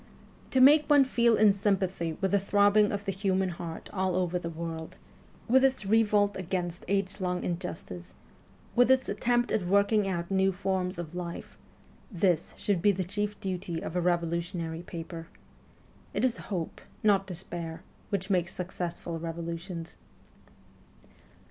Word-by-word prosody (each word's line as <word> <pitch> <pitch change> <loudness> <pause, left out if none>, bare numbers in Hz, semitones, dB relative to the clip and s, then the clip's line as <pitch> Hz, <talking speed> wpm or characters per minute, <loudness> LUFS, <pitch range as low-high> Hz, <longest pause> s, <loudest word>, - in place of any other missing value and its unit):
To 260 - +2
make 290 +3 +7
one 290 -2 +7
feel 235 -3 +3
in 210 -2 +6
sympathy 190 -5 0
with 195 - +1
the 200 - +4
throbbing 205 +1 +4
of 200 0 -3
the 195 - 0
human 190 -1 0
heart 170 -2 -7
all 190 -2 0
over 180 -1 0
the 170 - -5
world, 165 -1 -6 0.5
with 260 +3 +5
its 265 -5 +2
revolt 205 -1 +3
against 175 -1 -3
age 195 +1 -1
long 180 -1 -1
injustice, 170 - -5 0.6
with 245 +1 +5
its 260 0 +4
attempts 240 +4 +1
at 190 -5 0
working 200 +2 +3
out 170 -1 -3
new 190 0 +3
forms 190 -1 -2
of 170 -1 -6
life 175 -1 -6 0.6
this 175 -3 +1
should 200 -5 0
be 205 - +5
the 190 -1 -2
chief 205 +3 -3
duty 180 -3 -3
of 160 - -6
a 180 - +2
revolu 170 -1 +1
tionary 170 -1 -5
paper. 165 -1 -7 0.9
It - - +2
is 240 -2 0
hope, 175 -6 -4 0.2
not 195 -2 +3
despair, 170 -2 -6 0.3
which 200 0 -2
makes 180 -1 +1
successful 175 -2 -4
revolutions. 170 +1 -5
185 Hz, 150 wpm, -29 LUFS, 170-205 Hz, 0.9 s, make